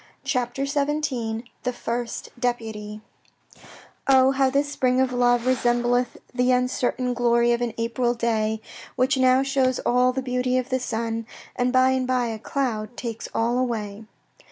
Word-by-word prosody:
CHAPTER 250 0 -1
XVII 280 -6 -1 0.2
THE 250 - -1
FIRST 240 -1 -4
DEPUTY 220 -4 -3 1.1
Oh, 265 -1 +6
how 270 0 +2
this 280 +2 +1
spring 255 -2 +1
of 260 -1 +1
love 245 -1 +2
resembleth 245 -1 +1 0.2
The 250 0 +2
uncertain 250 0 0
glory 240 0 +3
of 235 0 +1
an 240 -2 -2
April 240 +1 0
day, 220 -2 0 0.3
Which 260 +2 +2
now 260 0 +4
shows 265 -2 +1
all 250 +1 +3
the 260 +1 -3
beauty 250 0 0
of 255 0 -2
the 260 -1 0
sun, 230 -2 -3 0.3
And 250 0 +1
by 260 0 +4
and 260 -1 0
by 250 -2 +1
a 220 -1 -5
cloud 230 -3 -3
takes 230 -2 -5
all 235 +2 +1
away. 220 -4 -3
245 Hz, 155 wpm, -24 LUFS, 235-255 Hz, 1.1 s, Oh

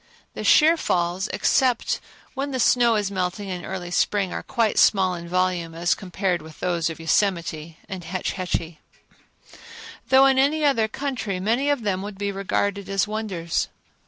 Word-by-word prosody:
The - - -6
sheer 320 +2 +6
falls, 180 - 0
except 255 0 +1 0.3
when 275 +1 -3
the 260 -2 -3
snow 240 -1 +4
is 205 -2 -1
melting 190 +1 -3
in 180 -2 -5
early 180 -1 -5
spring, 195 +1 +1
are - - -3
quite 230 -4 0
small 190 -3 +4
in 170 -1 -7
volume 180 -2 0
as 170 +1 +1
compared 185 -2 -2
with 155 0 -13
those 170 -2 0
of 165 - -7
Yosemite 165 -2 -1
and 190 -3 -6
Hetch 185 +3 -3
Hetchy; 170 -4 -3 1.3
though 265 +1 +7
in 265 -1 +4
any 295 +3 +2
other 230 -6 +3
country 230 -6 -3
many 235 +9 +1
of 285 -5 0
them 190 -3 -1
would 205 0 -7
be 200 0 -2
regarded 200 0 -2
as 195 0 +1
wonders. 200 -6 -2
195 Hz, 165 wpm, -23 LUFS, 175-225 Hz, 1.3 s, though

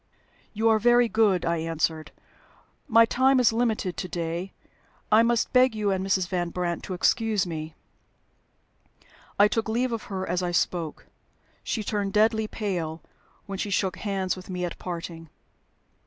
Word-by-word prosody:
"You 220 +1 +1
are 220 -1 +4
very 240 +2 +4
good," 215 -5 +2
I 170 0 +1
answered. 160 -1 -2 0.8
"My 230 +1 +6
time 260 +3 +3
is 235 -3 +4
limited 225 -6 -1
to 185 - -3
day. 170 +2 -4 0.6
I 215 +1 +7
must 235 0 +1
beg 250 -2 +4
you 210 -2 0
and 190 -1 -1
Mrs. 190 -2 +1
Van 175 -2 -2
Brandt 175 -1 -2
to 185 - -4
excuse 215 +1 +1
me." 155 -2 -6 1.6
I 205 - +6
took 225 +1 -2
leave 245 +3 0
of 230 -2 -4
her 190 -2 -4
as 180 +2 -1
I 180 - -1
spoke. 175 -2 -1 0.6
She 220 - -2
turned 200 -1 -2
deadly 220 0 +3
pale 175 -8 -4 0.4
when 195 -2 -6
she 205 - -2
shook 190 -1 0
hands 195 -3 -2
with 185 0 -12
me 180 -1 -2
at 175 - -6
parting. 165 -2 -6
195 Hz, 160 wpm, -26 LUFS, 175-220 Hz, 1.6 s, I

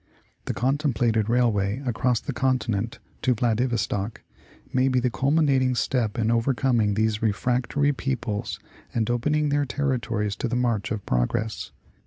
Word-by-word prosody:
The - - -3
contemplated 120 -5 +1
railway 115 -1 +1
across 120 -1 +1
the 140 - -5
continent 120 -4 0 0.2
to 125 -2 +2
Vladivostock 115 -3 -1 0.5
may 130 +1 +3
be 130 -1 +2
the 125 0 0
cxilmi 145 +5 +2
nating 130 -2 +2
step 120 -6 0
in 115 -1 +1
overcoming 115 -3 +2
these 110 0 +1
refractory 125 +6 +1
peoples 125 -6 -3 0.4
and 110 -2 +1
opening 150 +5 +1
their 145 0 +1
territories 120 -7 -1
to - - -1
the 120 - -2
march 115 -5 0
of 105 -3 -3
progress. 80 - -1
120 Hz, 140 wpm, -25 LUFS, 110-130 Hz, 0.5 s, may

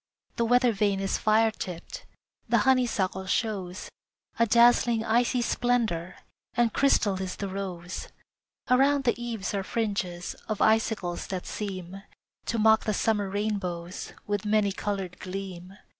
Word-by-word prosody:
The 235 - +2
weather 245 +1 +4
vane 200 -2 +1
is 195 0 -1
fire 220 +1 +3
tipped, 180 -5 -7 0.4
The 235 - +4
honeysuckle 220 -8 +1
shows 190 -4 -2 0.5
A 230 - +4
dazzling 235 0 +4
icy 240 +2 +2
splendor, 225 -10 0 0.4
And 240 -2 +2
crystal 205 -8 +2
is 185 -1 -4
the 200 - -4
rose. 185 -2 -5 0.6
Around 275 +2 +4
the 240 -1 0
eaves 225 -5 -3
are 200 - 0
fringes 190 -5 -2 0.2
Of 215 - -2
icicles 220 -5 +1
that 185 -2 -4
seem 190 -2 -5 0.5
To 230 - 0
mock 220 0 +4
the 215 - 0
summer 210 -3 +1
rainbows 190 -4 -3
With 205 0 -1
many 210 -1 +2
colored 195 -2 -4
gleam. 185 0 -7
205 Hz, 135 wpm, -27 LUFS, 190-230 Hz, 0.6 s, weather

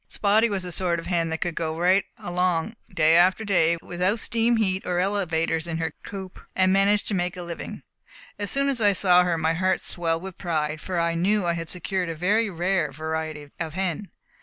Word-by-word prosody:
Spotty 215 +3 +3
was 195 -3 -2
the 180 - -5
sort 175 0 +1
of 165 - -6
hen 170 -2 0
that 160 0 -3
could 175 - -1
go 160 -1 -3
right 185 +3 +3
along 180 +3 -1 0.2
day 165 -3 +4
after 185 +5 +4
day 170 -4 +3
without 180 +5 0
steam 230 +1 +1
heat 190 -3 0
or 180 -1 -2
elevators 170 -4 0
in 165 -1 -3
her 160 -2 -2
coop 190 -2 -8 0.2
and 185 0 +3
manage 200 +1 +3
to - - -2
make 180 0 -1
a 180 - -5
living. 170 -1 -7 0.6
As 205 -1 -2
soon 275 0 +1
as 265 -4 -1
I 205 -1 +5
saw 180 -2 +5
her, 175 -2 0
my 160 0 +1
heart 185 +2 0
swelled 165 -1 -2
with 190 -2 -8
pride, 155 -3 -2
for 180 -2 -2
I 170 0 +1
knew 190 +4 +1
I 170 - +1
had 165 -1 -5
secured 180 0 -2
a 165 - -4
very 205 +7 +1
rare 175 -3 0
variety 155 0 -5
of 160 -1 -4
hen. 190 0 -2
180 Hz, 210 wpm, -25 LUFS, 165-195 Hz, 0.6 s, I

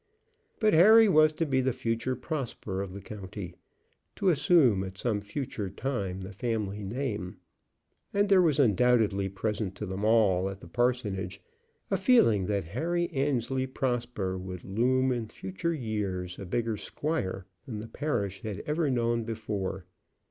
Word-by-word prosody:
But 215 -2 +3
Harry 215 +7 +8
was 155 -5 +5
to 165 - -1
be 130 -3 +1
the 130 +1 +1
future 115 +2 -2
Prosper 125 - -4
of 100 -2 -5
the 100 +2 -8
county; 95 -3 -7 0.6
to 195 - +2
assume 145 - +4
at 95 0 -7
some 105 -2 -1
future 105 -1 -4
time 100 -4 -3
the 95 +2 -7
family 105 -1 -2
name; 105 -4 -3 0.7
and 205 +1 +2
there 195 -2 +6
was 155 -4 +2
undoubtedly 110 -5 +3
present 100 0 -3
to - - -5
them 95 +2 -4
all 100 -4 +3
at 95 0 -7
the - - -12
parsonage 105 -4 -1 0.5
a 195 - +3
feeling 145 - +4
that 100 -2 0
Harry 175 - -1
Annesley 135 -3 0
Prosper 120 -8 -2
would 90 -1 -7
loom 130 +6 +2
in 120 -3 -2
future 95 - -3
years 100 - -3
a 100 - -7
bigger 115 +2 -1
squire 100 - -3 0.2
than 115 -5 -5
the 110 +2 -6
parish 110 -7 -2
had 105 -2 -5
ever 150 0 0
known 120 -2 +1
before. 105 -4 -4
115 Hz, 155 wpm, -29 LUFS, 95-135 Hz, 0.7 s, Harry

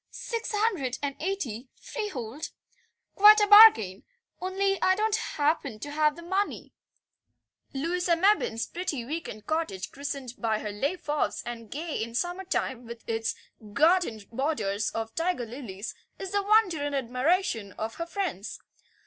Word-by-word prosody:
"Six 460 -1 -4
hundred 395 - 0
and 280 -1 -2
eighty, 280 - -3
freehold. 295 - -5 0.6
Quite 425 +2 +8
a 415 - +4
bargain, 410 - +8 0.4
only 390 +1 0
I 375 - +4
don't 430 +1 +1
happen 295 - -1
to 290 +6 -7
have 300 0 +2
the 340 - -10
money." 380 +4 -2 1.0
Louisa 340 +5 0
Mebbin's 335 - +2
pretty 335 -9 -4
week 320 +6 -4
end 215 0 -9
cottage, 315 - -2
christened 275 -3 -5
by 220 -2 +1
her 210 -1 -5
"Les 275 - -1
Fauves," 295 -3 -2
and 230 -2 -7
gay 310 +2 -4
in 230 +1 -5
summertime 350 -7 -2
with 235 0 -10
its 225 0 -1 0.4
garden 310 - +3
borders 220 -6 -1
of 225 0 -4
tiger 330 -6 -1
lilies, 225 -4 -7 0.2
is 385 -1 -6
the 405 0 +1
wonder 410 -5 +3
and 290 -1 -2
admiration 255 - 0
of 220 +1 -4
her 335 - -4
friends. 340 - -4
295 Hz, 145 wpm, -28 LUFS, 230-370 Hz, 1.0 s, Quite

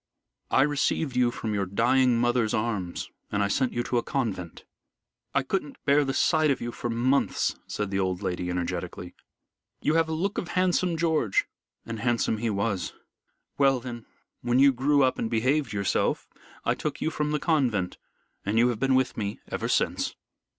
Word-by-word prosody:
I 130 - +4
received 145 -1 0
you 125 -1 +4
from 110 -2 -4
your 100 -2 -1
dying 120 +5 +3
mother's 120 -2 +2
arms 105 -6 -2 0.2
and 100 0 +1
I - - +2
sent 130 +5 +1
you 120 - -1
to 120 - 0
a - - -1
convent. 100 -12 -3 0.7
I - - +3
couldn't 150 0 -2
bear 145 +1 +5
the 135 - -1
sight 155 +2 +3
of 140 - +1
you 120 - -4
for 120 - -4
months," 125 +4 +1
said 105 -2 -3
the 95 - 0
old 95 0 -1
lady, 90 -1 -2
energetically. 90 -1 -4 0.7
"You 150 - +1
have 165 0 +2
a - - -1
look 190 +6 -1
of 175 - -5
handsome 180 -2 +2
George, 160 - +2 0.4
and 115 -1 -5
handsome 115 -1 +1
he 115 0 0
was. 100 -3 -1 0.7
Well 135 -2 +4
then, 120 -2 -8 0.3
when 120 +1 +1
you 135 +1 +6
grew 140 +3 +3
up 130 - +1
and 115 - -1
behaved 130 +4 +1
yourself, 100 -2 0 0.4
I - - +3
took - - -4
you 160 - -1
from 150 -1 -1
the 150 - +1
convent, 125 - 0 0.4
and 105 +3 -1
you 120 +2 +5
have 115 -3 -2
been 135 0 +3
with 130 -1 +1
me 100 -2 -3
ever - - -2
since." - - 0
120 Hz, 185 wpm, -27 LUFS, 105-140 Hz, 0.7 s, you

